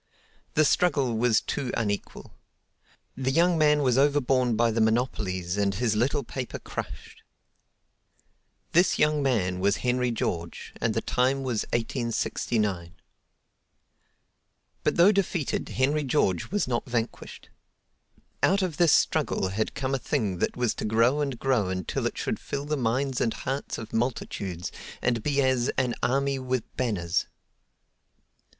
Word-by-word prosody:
The 155 - +5
struggle 140 -7 +2
was 115 0 +3
too 135 -4 -3
unequal. 105 -3 -3 0.8
The 130 0 -1
young 170 +5 +3
man 150 -2 +3
was 130 -1 +3
overborne 135 -4 +2
by 115 +1 +3
the 115 +1 0
monopolies 105 -6 0
and 100 -1 +1
his 110 +1 0
little 135 +6 +1
paper 125 +1 -5
crushed. - - -8 1.5
This 175 +3 +4
man 130 -12 +1
was 100 +2 +2
Henry 125 0 +1
George 85 -7 -3
and - - 0
the - - +1
time 135 +2 +1
was 120 -5 -1
1869. 110 -6 -1 1.9
But - - +1
though 175 +4 +6
defeated, 185 -7 -1
Henry 145 +3 +1
George 120 - +1
was 205 -4 0
not 120 0 -1
vanquished. 120 -1 -4 0.9
Out 195 +1 +3
of 175 -5 -2
this 170 -3 +5
struggle 95 - +2
had 105 +3 -2
come 135 -1 -2
a 135 - +1
thing 100 -6 -1
that - - -1
was 125 -2 +1
to - - -6
grow 115 +7 +3
and 140 -4 -2
grow 120 -7 +1
until 95 -2 -2
it - - -6
should - - -2
fill 140 0 -4
the 150 +1 -1
minds 130 +1 0
and 115 - 0
hearts 135 +2 -4
of 110 - -8
multitudes 100 -7 -2 0.3
and 120 -2 0
be 140 +2 +1
as 130 -1 +2
"an 125 -2 +1
army 135 +2 +1
with 130 -2 -1
banners." 95 -8 -1
125 Hz, 140 wpm, -27 LUFS, 110-140 Hz, 1.9 s, though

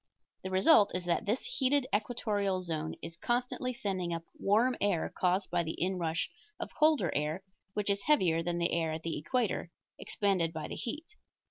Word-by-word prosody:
The 190 - -3
result 200 - +5
is 180 -1 -2
that 175 +5 0
this 220 +6 0
heated 285 - +2
equatorial 205 -4 0
zone 160 -3 -3
is 165 - -6
constantly 245 +6 -1
sending 190 -7 -2
up 165 - -5 0.2
warm 230 +6 +3
air 200 -5 +1
caused 185 +1 +1
by 175 0 +2
the 160 -1 -4
inrush 170 -3 0 0.3
of - - -5
colder 300 - +3
air, 150 +5 -1 0.3
which 205 -1 +1
is 200 0 0
heavier 180 - +3
than 170 +1 -2
the 170 0 +1
air 165 -2 +1
at 160 0 -5
the 165 - -2
equator, 195 - -1 0.3
expanded 185 -5 0
by 155 -2 -4
the - - -5
heat. 310 - -6
190 Hz, 175 wpm, -31 LUFS, 170-230 Hz, 0.3 s, result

